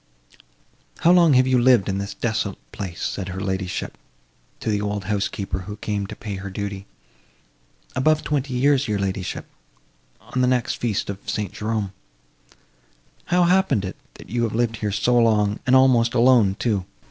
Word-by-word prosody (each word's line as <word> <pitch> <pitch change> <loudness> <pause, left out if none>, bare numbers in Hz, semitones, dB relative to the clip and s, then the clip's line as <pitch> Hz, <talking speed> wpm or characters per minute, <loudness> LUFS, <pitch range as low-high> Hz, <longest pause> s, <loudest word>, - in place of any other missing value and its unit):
"How 170 - +5
long 170 -4 +6
have 130 0 +5
you 130 -1 +3
lived 120 -5 +5
in 95 0 -1
this 100 +1 -5
desolate 110 -4 -2
place?" 90 -5 -6
said 95 -2 -3
her 95 0 -5
ladyship, 95 -1 -3 0.6
to 110 - -2
the 105 -1 0
old 105 -1 -2
housekeeper, 100 -1 -2
who 100 +3 -7
came 105 -2 -3
to - - -8
pay 105 -3 -6
her 100 +1 -6
duty. 100 0 -5 1.1
"Above 155 +4 +2
twenty 140 -3 -1
years, 140 +1 +3
your 105 -1 0
ladyship, 95 -1 -3 0.7
on 130 - -3
the 125 - +3
next 125 -2 0
feast 110 -5 -1
of 100 0 -9
St. 105 -3 -3
Jerome." 105 -2 -2 1.3
"How 180 0 +3
happened 180 - +2
it, 95 - -5 0.2
that - - -13
you 120 +1 0
have 115 -2 -1
lived 115 -1 0
here 105 -1 -2
so 120 +4 +1
long, 105 -2 +2
and 130 - +5
almost 125 -3 +4
alone, 115 -5 +5
too? 105 -4 0
105 Hz, 170 wpm, -23 LUFS, 100-125 Hz, 1.3 s, long